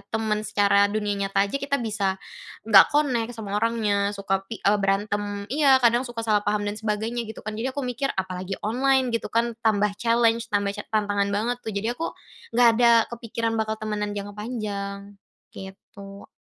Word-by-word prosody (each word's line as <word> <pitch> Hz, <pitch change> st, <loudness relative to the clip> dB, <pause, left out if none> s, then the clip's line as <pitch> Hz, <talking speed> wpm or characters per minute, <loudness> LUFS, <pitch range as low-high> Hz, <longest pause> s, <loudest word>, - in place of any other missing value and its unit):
temen 215 Hz, -1 st, -1 dB
secara 200 Hz, 0 st, +3 dB
dunia 210 Hz, -1 st, -1 dB
nyata 195 Hz, 0 st, +1 dB
aja, 275 Hz, -, -2 dB
kita 280 Hz, 0 st, -1 dB
bisa 205 Hz, -4 st, -2 dB, 0.5 s
enggak -, -, +9 dB
connect 250 Hz, -6 st, +1 dB
sama 205 Hz, -2 st, -4 dB
orangnya, 210 Hz, -3 st, 0 dB
suka 195 Hz, -1 st, -1 dB
i 225 Hz, -, -6 dB
eee, 205 Hz, +1 st, +3 dB
berantem 205 Hz, +1 st, -1 dB
iya, 275 Hz, -1 st, +4 dB
kadang 240 Hz, +1 st, +3 dB
suka 240 Hz, -1 st, -6 dB
salah 210 Hz, -2 st, +2 dB
paham 205 Hz, 0 st, +1 dB
dan 205 Hz, -, -4 dB
sebagainya 220 Hz, +2 st, -2 dB
gitu 220 Hz, -, -8 dB
kan. 215 Hz, 0 st, -5 dB
Jadi, 255 Hz, +4 st, -2 dB
aku 285 Hz, -, -2 dB
mikir 250 Hz, +2 st, -2 dB
"apalagi 185 Hz, 0 st, -4 dB
online 260 Hz, +4 st, +2 dB
gitu 230 Hz, -, -2 dB
kan?". 230 Hz, 0 st, 0 dB
Tambah 210 Hz, -2 st, +2 dB
challenge, 230 Hz, 0 st, +2 dB
tambah 200 Hz, -1 st, +1 dB
ca 205 Hz, -, -6 dB
tantangan 205 Hz, -1 st, +1 dB
banget 235 Hz, +4 st, 0 dB
tuh, 220 Hz, -, -4 dB
jadi 200 Hz, +3 st, -2 dB
aku 330 Hz, -, -2 dB, 0.5 s
enggak 240 Hz, 0 st, +6 dB
ada 235 Hz, 0 st, +5 dB, 0.2 s
kepikiran 230 Hz, -1 st, -3 dB
bakal 220 Hz, 0 st, -2 dB
temenan 210 Hz, -1 st, -3 dB
jangka 205 Hz, 0 st, -6 dB
panjang. 205 Hz, -3 st, -5 dB, 0.4 s
Gitu. 195 Hz, +1 st, -11 dB
215 Hz, 175 wpm, -24 LUFS, 200-235 Hz, 0.5 s, enggak